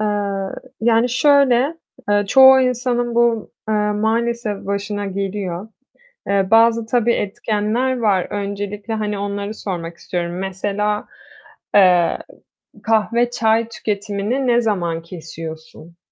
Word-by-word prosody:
Eee, 200 -2 -1 0.3
yani 230 +1 +3
şöyle: 275 +2 +3 0.3
Eee, 205 0 +3
çoğu 265 +2 +8
insanın 245 -1 0
bu, 235 -2 +1 0.2
eee, 215 - +1 0.2
maalesef 220 0 -1
başına 200 +1 -3
geliyor. 195 -1 -4 0.6
Eee, 200 -1 +1
bazı 230 0 +4
tabii 235 0 +2
etkenler 220 +5 -1
var 205 -6 +1
öncelikle, 205 +1 -4
hani, 210 -1 -2
onları 200 +1 -4
sormak 170 -5 -5
istiyorum. 175 0 -4
Mesela, 205 +2 -2 0.7
eee, 180 -4 +5 0.7
kahve 230 +2 +2
çay 225 -1 +1
tüketimini 210 +4 -2
ne 240 0 +3
zaman 175 -7 -1
kesiyorsun? 160 0 -10
210 Hz, 110 wpm, -19 LUFS, 195-235 Hz, 0.7 s, çoğu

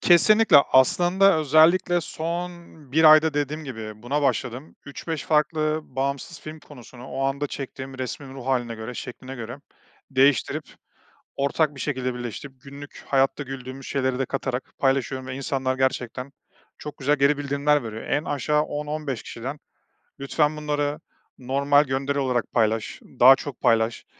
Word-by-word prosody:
Kesinlikle. 210 +1 +5 0.2
Aslında 175 +7 +4
özellikle 160 +4 +4
son 170 +3 -4 0.4
1 160 +2 +3
ayda, 155 0 +7
dediğim 150 +2 -2
gibi, 110 -5 -8
buna 145 +5 -1
başladım. 130 +1 -2
3-5 155 +2 -5
farklı, 155 0 +1
bağımsız 140 +5 -4
film 155 0 -9
konusunu 125 -2 -13
o 135 +1 -4
anda 140 +2 -1
çektiğim 130 -1 -7
resmin 130 +1 -6
ruh 130 -1 -9
hâline 120 -3 0
göre, 110 +3 -7
şekline 130 +2 -8
göre 120 +1 -7 0.5
değiştirip, 135 0 +2 0.7
ortak 145 +2 +1
bir 135 - -10
şekilde 130 -3 -2
birleştirip, 125 +2 -7
günlük 140 +1 -11
hayatta 135 +1 +1
güldüğümüz 135 0 -8
şeyleri 130 -2 -1
de 135 - +1
katarak 130 -1 -4
paylaşıyorum 135 -1 0
ve 130 - -5
insanlar 130 -1 -2
gerçekten 130 0 -2 0.5
çok 150 - -8
güzel 145 +2 +2
geri 140 +1 +3
bildirimler 145 +1 +1
veriyor. 110 0 -6
En 150 - -1
aşağı 150 +1 0
10-15 150 -4 -4
kişiden 135 +6 -7 0.6
lütfen 150 +2 0
bunları 145 -1 -2 0.4
normal 140 +3 +2
gönderi 135 +1 -2
olarak 125 -4 0
paylaş, 110 -1 0 0.2
daha 130 +2 +9
çok 135 -2 -8
paylaş, 115 0 +1
140 Hz, 140 wpm, -24 LUFS, 130-150 Hz, 0.7 s, daha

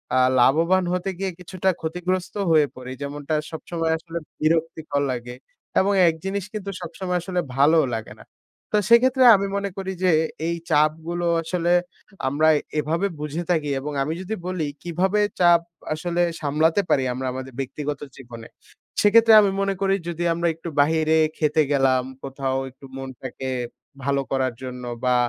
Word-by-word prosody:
আ - - +4 0.2
লাভবান 165 +9 +4
হতে 180 +1 -1
গিয়ে 195 -1 -1
কিছুটা 185 +1 -2
ক্ষতিগ্রস্ত 180 +3 -2 0.2
হয়ে 155 -2 +5
পড়ি। 130 0 -8
যেমনটা 145 +2 -3 0.2
সবসময় 165 0 -3
আসলে 165 +1 -7 0.2
বিরক্তিকর 160 -2 0
লাগে 125 0 -5 0.4
এবং 200 +2 +2
এক 165 - +2
জিনিস 195 -1 -2
কিন্তু 205 -2 -5
সবসময় 180 +2 -3
আসলে 180 0 -2 0.2
ভালোও 150 +3 +5
লাগে 110 -1 -6
না। - - -15 0.5
তো - - +5
সেক্ষেত্রে 255 +2 +5
আমি 200 0 0
মনে 200 0 -2
করি 190 -1 -3
যে, 185 - +5 0.4
এই 170 - 0 0.2
চাপগুলো 160 +3 +1 0.2
আসলে 175 +1 -1 0.6
আমরা 145 +4 +2 0.3
এভাবে 165 +6 0
বুঝে 150 +3 -3
থাকি। 155 -4 +1
এবং 145 +3 -5
আমি 155 +3 -2
যদি 200 +4 -4
বলি 180 -5 -2 0.2
কিভাবে 180 +4 0 0.2
চাপ 175 -1 +6 0.3
আসলে 175 +2 -1 0.2
সামলাতে 160 +5 +2
পারি 135 - +3
আমরা 130 +1 -4
আমাদের 130 0 -7
ব্যক্তিগত 145 +2 -4 0.2
জীবনে? 120 -3 -10 0.5
সেক্ষেত্রে 225 +2 +6
আমি 200 -2 +2
মনে 195 0 +1
করি 195 0 +3
যদি 170 0 -3
আমরা 170 +1 0
একটু 165 +1 -7
বাহিরে 160 +2 +3 0.2
খেতে 155 0 +2
গেলাম 135 -2 +3 0.2
কোথাও 135 -1 -2
একটু 135 - -16
মনটাকে 130 0 -6 0.5
ভালো 140 +1 +1
করার 130 -2 0
জন্য 125 -1 -6 0.2
বা, 125 0 +3
160 Hz, 155 wpm, -23 LUFS, 140-180 Hz, 0.6 s, চাপ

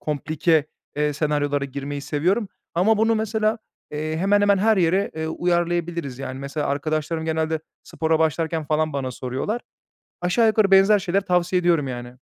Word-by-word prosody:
komplike, 155 +1 0 0.3
eee, 150 0 +1
senaryolara 145 -1 0
girmeyi 140 +1 -5
seviyorum. 180 +10 0 0.3
Ama 205 +5 +3
bunu 225 +1 +3
mesela, 220 0 0 0.3
eee, 155 +1 -3
hemen 200 +4 +3
hemen 200 -1 +4
her 220 +2 +3
yere, 185 +2 +2
eee, 160 0 -2
uyarlayabiliriz, 170 -5 -1
yani. 130 -1 -5
Mesela 140 +2 -3
arkadaşlarım 155 +3 -2
genelde 160 0 -1 0.2
spora 160 0 0
başlarken 160 0 0
falan 155 +1 0
bana 135 -2 -2
soruyorlar. 135 - -3 0.6
Aşağı 180 +6 +2
yukarı 215 -2 +3
benzer 195 +2 +6
şeyler 195 0 0
tavsiye 180 -1 +1
ediyorum, 170 -5 +2
yani. 120 0 -7
160 Hz, 150 wpm, -23 LUFS, 145-190 Hz, 0.6 s, benzer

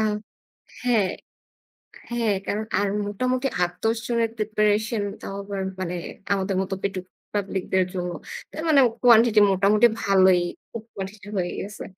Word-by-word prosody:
আ - - +2 0.8
হ্যাঁ, 220 -7 +2 1.0
হ্যাঁ। 230 -4 +1
কারণ 215 +2 -1
আর 205 - +1 0.2
মোটামুটি 255 +6 0 0.2
৮-১০ 225 +6 -1
জনের 230 -2 +1
preparation 215 +1 +1 0.2
তাও 195 - -6
আবার 195 -1 -4 0.2
মানে 180 -1 -3 0.4
আমাদের 195 0 -1
মতো 195 0 -3
পেটুক 190 -2 -2 0.3
public 195 -2 -1
দের 185 -1 +4
জন্য। 180 -1 -2 0.4
তার 315 - -5
মানে 285 -3 +6 0.2
quantity 230 -2 +6
মোটামুটি 205 +4 +5 0.2
ভালোই, 190 -2 +5 0.3
খুব 225 -2 -6
quantity 200 +1 -7
হয়ে 175 -1 -1
গেছে। 205 +2 -7
205 Hz, 135 wpm, -24 LUFS, 190-225 Hz, 1.0 s, মানে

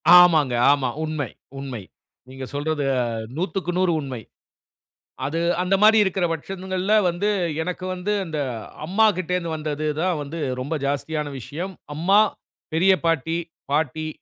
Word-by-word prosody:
ஆமாங்க 160 -8 +7 0.2
ஆமாங்க, 130 -4 0
உன்ம 155 -1 -2 0.4
உண்மை 130 -5 -5 0.5
நீங்க 130 0 -7
சொல்றது 145 +1 -1 0.5
100/100 185 0 0
உண்மை. 130 -4 -5 1.1
அது 160 +4 -1 0.2
அந்த 185 +2 +2
மாரி 220 +1 +7
இருக்குற 190 -2 0
பட்சங்கள்ல 185 +4 -2 0.2
வந்து 175 +5 0 0.3
எனக்கு 180 +2 -4
வந்து 185 +3 -3
அந்த 160 -3 -4 0.5
அம்மா 195 +7 +3
கிட்டருந்து 180 -1 -1
வந்தது 155 -1 -3 0.2
தான் 180 -2 +1
வந்து 145 +4 -6 0.2
ரொம்ப 145 +5 -2
ஜாஸ்தியான 145 +1 -2
விஷயம். 160 - -5 0.2
அம்மா, 190 +7 +4 0.5
பெரிய 185 +4 +5
பாட்டி, 165 0 +1 0.3
பாட்டி 155 +1 0
165 Hz, 120 wpm, -23 LUFS, 145-185 Hz, 1.1 s, ஆமாங்க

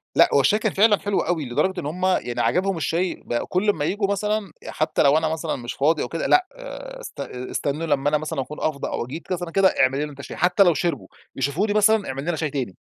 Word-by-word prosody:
لأ، - - +6
هو 140 - +5
الشاي 205 +11 +3
كان 220 -3 -1
فعلًا 205 0 +4
حلو 205 -1 -1
أوي، 165 -5 -1
لدرجة 150 +10 0
إن 160 - -6
هم 180 +5 -2
يعني 125 -10 0
عجبهم 190 0 +1
الشاي، 170 +3 -1
بقوا 120 - -2
كل 190 +4 +1
أما 155 -7 +1
ييجوا 200 +3 0
مثلًا، 210 -1 -1 0.2
حتى 155 0 0
لو 145 +2 +5
أنا 160 0 +1
مثلًا 160 0 -2
مش 120 -2 -6
فاضي 155 +2 +2
أو - - -3
كده، 165 +5 -3
لأ، 370 0 +4
آآ - - -9
أست - - -10
است - - -5 0.2
استنوا 150 +4 -2
لما 145 -1 +2
أنا 150 - +2
مثلًا 150 -3 -3
أكون 150 +3 -8
أفضى 150 -3 -1
أو - - -3
جيت 160 +8 -8
مثلًا 175 -1 -4
كده: 195 +2 +4
"اعمل 135 +1 +3
لنا 150 0 -3
أنت 140 - -15
الشاي." - - -8
حتى 180 +3 +4
لو 175 -3 +4
شربوا، 170 +3 -2 0.3
يشوفوني 150 +11 0
مثلًا: 215 -1 +3
"اعمل 135 +1 -4
لنا 175 -1 0
شاي 155 -1 -2
تاني." 130 -10 -4
165 Hz, 245 wpm, -23 LUFS, 145-195 Hz, 0.3 s, لأ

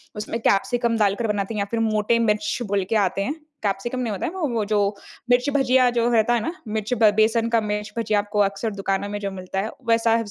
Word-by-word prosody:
उसमें 215 +2 -4
कैप्सिकम 235 +3 +1
डालकर 210 +2 +1
बनाते 205 0 -2
हैं - - -2
या 200 - 0
फिर 230 - 0
मोटे 220 +1 +1
मिर्च 230 +7 0
बोल 200 -1 0
के 225 - +1
आते 190 +1 -2
हैं। 275 - -2 0.3
कैप्सिकम 205 +5 -2
नहीं 240 -3 -2
होता 195 - -3
है - - -2
वो 365 -5 -1
वो 230 -3 -1
जो 210 0 +1 0.5
मिर्च 245 +2 +3
भजिया 255 -2 +4
जो 235 0 +3
रहता 225 +1 +3
है 240 - +2
ना, 330 - -3
मिर्च 215 +2 -2
बे 215 -2 +7
बेसन 225 +1 +3
का 230 -1 +2
मिर्च 210 0 -3
भजिया 215 -2 +1
आपको 205 0 -2
अक्सर 200 +2 0
दुकानों 195 0 -2
में 205 0 -4
जो 200 -1 -3
मिलता 190 0 -5
है 215 - -3 0.2
वैसा 230 0 +3
220 Hz, 235 wpm, -23 LUFS, 205-235 Hz, 0.5 s, बे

